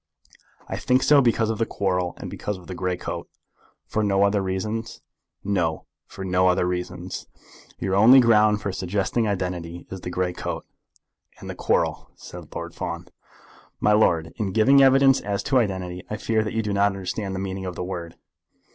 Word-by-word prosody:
"I - - -4
think 130 +1 +2
so 145 -2 +6
because 115 -3 +2
of 110 - -4
the 115 - +2
quarrel, 90 -3 -1
and - - -7
because 105 -2 -4
of 90 - -14
the 95 - -7
grey 90 0 -2
coat." - - -6 0.6
"For 110 - -1
no 100 -1 +2
other 100 0 +2
reasons?" 105 +5 -3 0.4
"No; 85 -6 -1 0.2
for 95 - -8
no 90 0 +2
other 90 0 +2
reasons." 90 0 -4 0.5
"Your 95 0 -2
only 115 +7 +8
ground 110 -3 +4
for 100 - -1
suggesting 95 +5 -1
identity 90 -3 -3
is 95 -1 -6
the - - -5
grey 90 0 -1
coat?" - - -5 0.7
"And - - -7
the - - -5
quarrel," - - 0
said - - -11
Lord - - -5
Fawn. - - -5 0.7
"My 105 - +3
lord, 85 -6 +2
in 100 -4 -2
giving 135 +6 +5
evidence 135 0 +5
as 100 -1 -2
to 135 -2 +3
identity, 95 -5 -2
I 105 - -3
fear 110 0 0
that 110 - -4
you 115 - 0
do 105 -1 -2
not 100 0 +4
understand 95 0 -3
the - - -3
meaning 95 0 -4
of 90 - -5
the - - -4
word." 85 -2 -6
100 Hz, 185 wpm, -24 LUFS, 90-110 Hz, 0.7 s, only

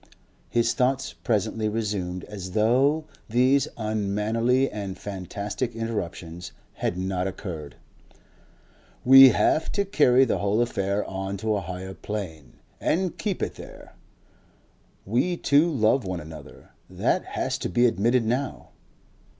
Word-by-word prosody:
His 115 -1 +2
thoughts 130 0 0
presently 110 0 -1
resumed 100 -5 -3
as 95 -3 -8
though 130 +8 +3 0.2
these 130 +4 +3
unmannerly 110 +4 +1
and 100 -3 -5
fantastic 100 +5 -4
interruptions 90 -6 -5 0.2
had 90 - -2
not 95 0 -1
occurred. 85 -6 -7 1.3
"We 135 +1 +10
have 155 - +2
to 200 -1 +1
carry 135 -8 +4
the 120 - 0
whole 100 +2 +1
affair 100 -4 0
on 95 +1 -4
to 110 +2 -1
a 100 - -1
Higher 95 +1 -6
Plane 80 - -6 0.3
and 180 +1 0
keep 205 -4 -2
it - - -2
there. - - -12 1.1
We 125 - 0
two 150 +3 +3
love 125 -1 +2
one 95 -2 -3
another 80 -2 -12 0.2
that - - 0
has - - -1
to - - -3
be 120 +7 +3
admitted 115 +2 +2
now. 125 +4 -2
110 Hz, 125 wpm, -25 LUFS, 95-125 Hz, 1.3 s, We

